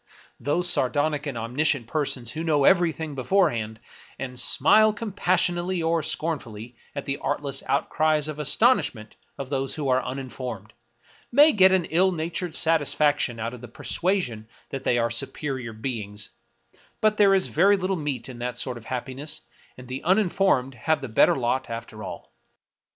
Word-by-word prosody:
Those 155 +8 +1
sardonic 145 -1 +1
and 135 -4 -4
omniscient 125 +3 0
persons 130 -3 -2
who 160 +2 -4
know 150 -4 +2
every 175 0 +5
thing 160 -1 -6
beforehand, 125 - 0 0.4
and 125 -2 -6
smile 215 +12 +4
compassionately 185 -4 0
or 165 0 +1
scornfully 125 -8 -4 0.2
at 140 - -4
the 140 0 -3
artless 140 -2 -2
outcries 155 +2 +1
of 155 -1 -6
astonishment 150 - +1 0.2
of 140 -1 -7
those 135 -1 -1
who 145 -3 -2
are 130 0 +3
un 130 - -4
informed, 125 -5 -7 0.6
may 290 +5 +7
get 190 -5 +5
an 185 -3 +2
ill 185 +4 +2
natured 170 0 -4
satisfaction 145 -6 +1
out 115 +2 -3
of 125 - -10
the 120 - -9
persuasion 120 - -2 0.2
that 135 -1 -6
they 120 - +2
are 115 -1 +1
superior 130 0 -3
beings; 110 -3 -5 0.7
but 215 0 +2
there 200 -2 +5
is 190 - +3
very 200 +5 +3
little 190 0 -1
meat 145 -7 -3
in 125 -2 -9
that 125 0 -4
sort 125 -2 -3
of 115 - -17
happiness, 130 +4 -4 0.3
and 125 0 -11
the 130 +1 -5
uninformed 185 -8 +2
have 150 +5 -1
the 135 - -5
better 110 - +4
lot 130 0 -1
after 115 -2 -7
all. - - -9
145 Hz, 160 wpm, -25 LUFS, 125-170 Hz, 0.7 s, may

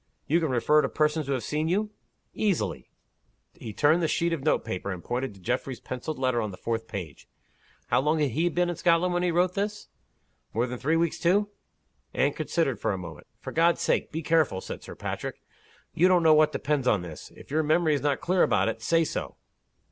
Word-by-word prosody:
"You 160 +4 +2
can 160 -3 -1
refer 130 +5 +3
to - - -1
persons 155 -1 0
who 140 - 0
have 125 -4 -2
seen 155 +6 -1
you?" 210 +5 0 0.4
"Easily." 180 - -1 0.6
He 110 - -8
turned 150 +10 +3
the 165 - +2
sheet 170 +2 0
of 150 -5 -3
note 155 - +1
paper, 100 -3 -4
and 90 -2 -6
pointed 125 -3 -3
to - - -16
Geoffrey's 125 +5 -3
penciled 135 +5 -5
letter 130 -2 +1
on 110 - -2
the 90 - -9
fourth 115 -1 -3
page. 85 -7 -7 0.6
"How - - +3
long 150 +3 +1
had 150 -4 +1
he 165 +8 +1
been 175 +1 +1
in - - -4
Scotland, 170 +1 +2
when 175 - +1
he 180 - +1
wrote 175 +2 +2
this? 205 +2 -3 0.7
More 115 +2 +2
than 125 -1 -6
three 155 +4 +1
weeks, 170 0 0
too?" 200 +4 +2 0.7
Anne - - +2
considered 135 - -1
for - - 0
a - - -3
moment. 85 -4 -9
"For - - -6
God's 170 +1 +3
sake, - - 0
be 160 +1 -4
careful!" 155 - +2
said - - -7
Sir - - -10
Patrick. - - -5 0.5
"You 180 - +4
don't 180 -2 +4
know 160 -1 +7
what 155 0 +5
depends 145 -3 -1
on 105 -7 +2
this, 80 -3 -9
If - - -14
your 155 +2 +2
memory 155 +1 +2
is 145 - 0
not 145 -1 0
clear 180 0 +1
about - - +3
it, - - -5
say 165 0 +3
so." - - -4
150 Hz, 220 wpm, -27 LUFS, 125-170 Hz, 0.7 s, know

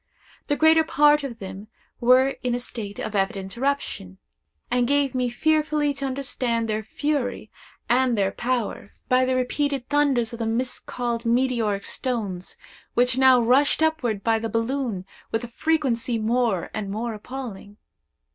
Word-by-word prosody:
The 290 - +1
greater 320 +1 +5
part 295 -1 +4
of 250 -4 -5
them 195 0 -8 0.3
were 255 +2 +5
in 245 -2 0
a - - -2
state 210 -4 -6
of 215 - -4
evident 195 0 -1
eruption, 255 - -2 0.5
and 245 -1 +2
gave 280 -1 +2
me 250 -1 0
fearfully 300 +2 +1
to 275 0 -3
understand 255 -3 -1
their 215 0 -1
fury 245 0 -2 0.4
and 250 -1 +2
their 195 -1 +1
power, 240 -4 -2 0.2
by 255 0 +4
the 260 0 +1
repeated 270 +1 -1
thunders 280 -6 +2
of 235 - -7
the 225 - -1
miscalled 240 0 -2
meteoric 230 -4 +1
stones, 205 -8 -3 0.4
which 245 +1 +3
now 260 -1 +7
rushed 265 +6 +3
upward 245 -11 0
by 225 -1 +2
the 225 0 -3
balloon 230 -4 -2 0.3
with 225 +1 -1
a - - -4
frequency 245 -3 0
more 225 -4 0
and 210 -2 -4
more 225 +3 -3
appalling. 210 -3 -8
245 Hz, 150 wpm, -24 LUFS, 225-270 Hz, 0.5 s, now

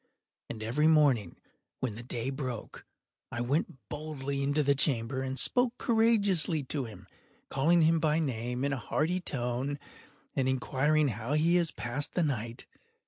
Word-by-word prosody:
And 110 -2 -6
every 140 +8 +2
morning, 140 - +3 0.4
when 125 -4 -2
the 110 - -8
day 120 +1 -4
broke, 130 -5 -6 0.4
I 120 - -4
went 130 +1 -2
boldly 140 -2 -4
into 145 +2 +1
the 140 0 +3
chamber, 130 -2 0
and 130 0 -3
spoke 245 - +4
courageously 200 - +3
to 135 0 -2
him, 110 - -11 0.4
calling 165 +6 +3
him 165 +1 +4
by 155 -1 +2
name 125 -3 -2
in 140 - 0
a - - -2
hearty 160 +8 -1
tone, 130 -2 -3 0.6
and 130 -2 +1
inquiring 140 +3 +1
how 115 +4 -3
he 160 +3 +3
has 170 -2 +3
passed 120 +6 -4
the 175 - +2
night. 120 -4 -3
140 Hz, 155 wpm, -30 LUFS, 125-155 Hz, 0.6 s, spoke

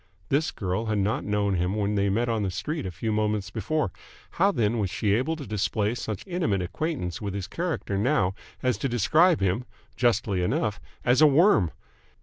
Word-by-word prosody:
This 150 +4 +2
girl 95 0 -3
had 110 -1 0
not 100 +2 0
known 105 -1 +1
him 90 +2 0
when 105 -1 0
they 100 -1 +2
met 115 +5 +1
on 115 -2 0
the 100 - 0
street 105 - -3
a - - -4
few 110 +6 -3
moments 105 -2 0
before. 115 +2 -1 0.4
How 195 +3 +3
then 115 - +1
was 100 -3 0
she 100 +2 0
able 130 +9 +1
to 150 -3 -7
display 105 +1 0
such 110 -5 -5
intimate 165 - 0
acquaintance 90 - -3
with 100 -2 -3
his 100 -2 -3
character 150 - -2
now 95 -2 +2 0.3
as 125 -1 +1
to 135 - -1
describe 155 - +3
him 95 +5 +1 0.3
justly 110 -6 +1
enough 100 +3 -1 0.2
as 125 +4 +4
a 155 - +9
worm? 150 - +5
105 Hz, 190 wpm, -26 LUFS, 100-130 Hz, 0.4 s, a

